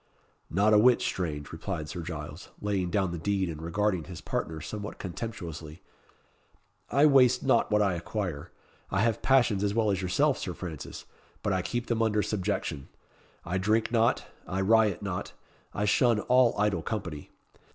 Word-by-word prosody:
"Not 100 +5 +3
a 105 - +7
whit 125 +2 +6
strange," 75 -5 -3
replied 80 -1 -4
Sir 85 +4 -5
Giles, 80 -3 -7
laying 100 -3 -1
down 95 -1 0
the 85 - -4
deed 95 0 0
and 80 -1 -8
regarding 90 +1 0
his 90 -3 -8
partner 80 -1 -3
somewhat 105 +7 -6
contemptuously. 85 -6 -7 1.1
"I 140 +5 +4
waste 130 -4 +5
not 135 - +3
what 105 0 +3
I 100 -2 +2
acquire. 85 -3 -4 0.4
I 95 - +1
have 115 -1 +1
passions 120 -7 +3
as 100 0 0
well 110 -2 +2
as 95 -1 -1
yourself, 135 +11 +2
Sir 90 - -4
Francis; 80 -6 -7 0.4
but 100 - +1
I 95 - +1
keep 120 +7 -3
them 115 -1 0
under 105 -2 +2
subjection. 95 -8 -2 0.6
I 90 +2 -1
drink 110 +4 +1
not 115 -1 +2 0.2
I 95 +1 -1
riot 105 -2 +3
not 95 -3 -4 0.4
I 105 - -1
shun 115 +2 +3
all 125 -1 +4
idle 100 -4 +1
company. 85 -8 -5
100 Hz, 165 wpm, -28 LUFS, 85-110 Hz, 1.1 s, a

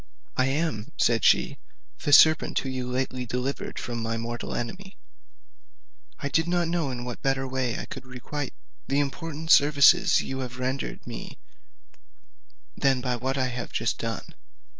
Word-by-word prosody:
"I 130 - +2
am," 135 -7 -2
said - - +2
she, - - +3 0.4
"the 145 - -1
serpent 155 +2 +6
whom 135 - -1
you 125 -1 -3
lately 130 0 -2
delivered 125 +3 -3
from 120 -1 -4
my 115 0 -2
mortal 120 +1 -4
enemy. 190 - -6 1.2
I 140 - -3
did 160 +4 +1
not 175 -1 +1
know 165 -4 0
in 120 -1 -5
what 125 -1 -6
way 130 -2 0
I - - -5
could 135 - -8
better 130 - -19
requite 140 +3 -5 0.3
the 140 - +1
important 160 +2 -3
services 150 +5 +6
you 135 0 -4
have 125 -1 -5
rendered 130 +2 -3
me - - -7 1.4
than 135 -2 +2
by 125 0 -1
what 130 +3 -2
I 130 -1 +1
have 125 -1 -5
just - - -1
done. - - -5
135 Hz, 160 wpm, -26 LUFS, 125-145 Hz, 1.4 s, serpent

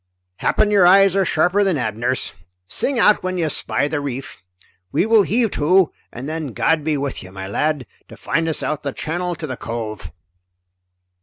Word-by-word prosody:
Happen 210 -1 +1
your 195 -4 +5
eyes 195 0 +6
are 195 - +3
sharper 180 +4 +2
than 190 -5 +1
Abner's. 120 +1 -2 0.3
Sing 275 - -2
out 210 -2 +4
when 185 0 -3
you 165 -3 0
spy 145 - 0
the 145 -1 -2
reef. 135 -1 -6 0.5
We 150 - +2
will 225 -1 +5
heave 225 +2 +1
to, 180 +3 +3 0.2
and 125 +3 -7
then 155 -5 -4
God 150 +8 +1
be 155 -1 0
with 140 -1 -3
you, 95 - -11
my 95 0 -7
lad, 150 +6 -1 0.2
to - - -13
find 165 +1 -1
us 160 - -1
out 150 -1 -2
the 140 -2 -4
channel 175 +2 -3
to 160 - -6
the 130 -4 -5
cove!" 110 -7 -6
155 Hz, 185 wpm, -20 LUFS, 130-185 Hz, 0.5 s, eyes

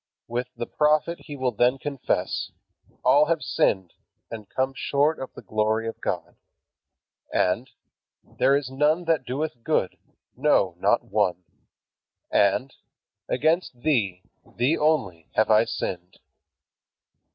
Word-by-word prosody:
With 120 +1 -2
the - - -4
prophet 155 +4 +1
he 145 - -7
will 130 -2 0
then 125 +2 +2
confess: 140 -1 -2 0.6
"All 145 +2 +6
have 165 -1 0
sinned, 95 -3 +1 0.4
and 110 -3 -8
come 130 +1 -1
short 145 +4 +1
of 130 - -6
the - - -10
glory 110 +1 0
of 115 - -6
God." - - -3 0.9
And, 115 +8 +1 0.5
"there 135 - +2
is 140 -2 -2
none 150 +5 +2
that 160 -6 +1
doeth 130 -1 -4
good, 135 -11 0 0.4
no, 125 - +3
not 105 +6 +3
one." 100 -6 0 0.9
And, 125 +7 +2 0.6
"against 155 -2 +1
thee, 105 -11 0 0.2
thee 125 +7 0
only, 120 - 0
have 110 0 +3
I 110 +1 +6
sinned." 90 -4 -5
125 Hz, 125 wpm, -25 LUFS, 110-150 Hz, 0.9 s, All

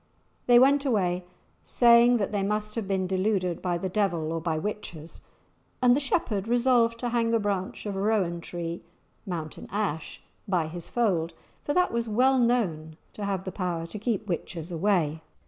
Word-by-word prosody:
They 245 -1 +7
went 275 +3 +5
away 185 -9 0 0.4
saying 240 0 +5
that 200 -2 -2
they 205 -2 0
must 210 +1 -1
have 220 -3 -3
been 190 -1 0
deluded 185 -2 0
by 175 -2 0
the 190 - -3
devil 180 -5 0
or 165 - -2
by 160 -1 -1
witches; 170 -4 -5 0.6
and 250 -1 +5
the - - +2
shepherd 225 - -1
resolved 240 -1 +3
to 245 - -1
hang 230 -1 +1
a - - +3
branch 200 -2 -3
of 205 -2 -3
rowan 195 -4 0
tree 170 0 -5 0.5
(mountain 160 -4 -5
ash) 190 -7 -3 0.3
by 180 -5 +1
his 170 +2 -7
fold, 180 -9 0 0.3
for 290 - -2
that 360 -6 +2
was 235 0 -1
well 255 +5 +3
known 175 -11 0 0.2
to 205 - -5
have 195 -2 -2
the 185 - -5
power 175 -3 -3
to 205 +5 -7
keep 220 -2 -1
witches 170 -2 -4
away. 165 -3 +1
200 Hz, 175 wpm, -27 LUFS, 175-230 Hz, 0.6 s, They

